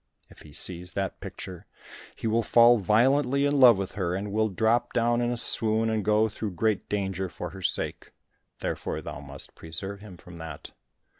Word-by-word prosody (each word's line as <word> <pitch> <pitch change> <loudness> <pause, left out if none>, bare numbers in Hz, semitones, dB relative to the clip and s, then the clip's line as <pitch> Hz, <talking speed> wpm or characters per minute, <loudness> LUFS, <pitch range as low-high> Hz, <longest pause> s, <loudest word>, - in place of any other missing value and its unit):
If - - -16
he 75 - -14
sees 90 +3 -1
that 95 -2 -3
picture, 90 -2 -8 0.5
he - - -8
will 115 +1 +2
fall 120 +1 +6
violently 130 +7 +3
in 145 0 +2
love 120 -5 +8
with 95 -1 -3
her, 90 -3 -2
and 100 +2 -4
will 110 +1 +1
drop 115 +5 +1
down 120 0 +2
in 120 - +1
a 120 - -2
swoon, 110 -1 +2
and 110 -2 -1
go 105 +2 +3
through 105 -2 -5
great 110 +1 0
danger 95 -2 -2
for - - -7
her 95 - -10
sake, - - -2 0.5
therefore - - -3
thou - - -7
must 70 0 -7
preserve 95 +5 -6
him 100 -4 -12
from 85 0 -13
that." 80 -3 -8
105 Hz, 190 wpm, -27 LUFS, 95-115 Hz, 0.5 s, love